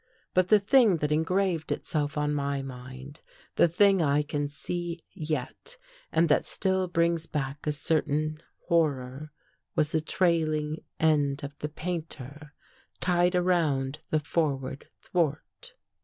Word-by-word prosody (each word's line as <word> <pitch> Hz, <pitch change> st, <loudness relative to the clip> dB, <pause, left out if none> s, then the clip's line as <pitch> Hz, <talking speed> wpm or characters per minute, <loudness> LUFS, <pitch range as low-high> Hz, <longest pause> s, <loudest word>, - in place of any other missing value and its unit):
But 185 Hz, -1 st, +3 dB
the 215 Hz, -, +7 dB
thing 220 Hz, -2 st, +5 dB
that 150 Hz, -1 st, -1 dB
en 155 Hz, +1 st, +3 dB
graved 180 Hz, -2 st, 0 dB
itself 145 Hz, -2 st, -2 dB
on 150 Hz, 0 st, +1 dB
my 140 Hz, -1 st, -1 dB
mind 130 Hz, +3 st, -9 dB, 0.2 s
— -, -, -29 dB
the -, -, +5 dB
thing 195 Hz, +2 st, +4 dB
I 145 Hz, -1 st, +3 dB
can 145 Hz, -1 st, -2 dB
see 170 Hz, +3 st, -4 dB
yet, 155 Hz, -, -4 dB, 0.3 s
and 165 Hz, +1 st, +3 dB
that 150 Hz, -, +2 dB
still 190 Hz, -1 st, +1 dB
brings 170 Hz, -1 st, +1 dB
back 140 Hz, 0 st, -4 dB
a -, -, +3 dB
certain 155 Hz, 0 st, 0 dB, 0.2 s
horror, 145 Hz, -3 st, 0 dB, 0.4 s
was 150 Hz, -1 st, +2 dB
the 160 Hz, -, +1 dB
trailing 155 Hz, -3 st, +1 dB, 0.2 s
end 145 Hz, -3 st, +2 dB
of 140 Hz, 0 st, -6 dB
the 150 Hz, -, -3 dB
painter 155 Hz, -3 st, -6 dB, 0.5 s
tied 180 Hz, 0 st, +2 dB
around 155 Hz, -7 st, +1 dB
the 155 Hz, -, +2 dB
forward 140 Hz, -4 st, -2 dB
thwart. 175 Hz, -, -2 dB
155 Hz, 140 wpm, -28 LUFS, 145-175 Hz, 0.5 s, the